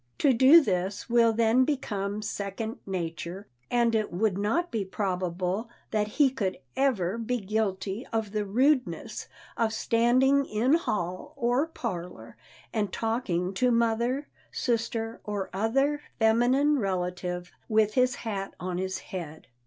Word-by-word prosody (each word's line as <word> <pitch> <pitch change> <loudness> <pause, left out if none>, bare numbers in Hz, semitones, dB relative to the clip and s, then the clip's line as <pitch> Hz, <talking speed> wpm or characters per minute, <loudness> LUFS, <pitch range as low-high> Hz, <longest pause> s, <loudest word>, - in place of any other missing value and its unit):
To 280 -3 +4
do 265 +8 +8
this 190 - -2
will 235 -1 +5
then 230 +3 +3
become 210 -7 -2
second 210 +2 -4
nature, 175 +1 -4 0.2
and 235 -1 +2
it 215 -1 0
would 200 +2 +1
not 225 - 0
be 225 -4 -1
probable 185 +2 -2 0.2
that 210 -1 +1
he 285 -4 +5
could 205 -8 -2 0.2
ever 230 -7 +1
be 245 +2 -1
guilty 200 +1 -2
of 220 -3 -1
the 210 0 -1
rudeness 255 +7 0 0.3
of 225 -1 +1
standing 255 +5 +3
in 235 +6 +1
hall 210 - -1
or 250 +3 +1
parlor 175 - -6 0.4
and 205 -3 0
talking 210 -6 -1
to 250 +6 +2
mother, 235 +4 +1 0.2
sister 230 -1 -2
or 205 -2 -4
other 270 +9 +1 0.2
feminine 250 +6 +3
relative 180 -2 -2 0.2
with 215 -1 +3
his 255 -1 +3
hat 195 -3 -3
on 180 0 -3
his 190 0 -2 0.2
head. 160 -6 -6
220 Hz, 135 wpm, -28 LUFS, 190-245 Hz, 0.4 s, do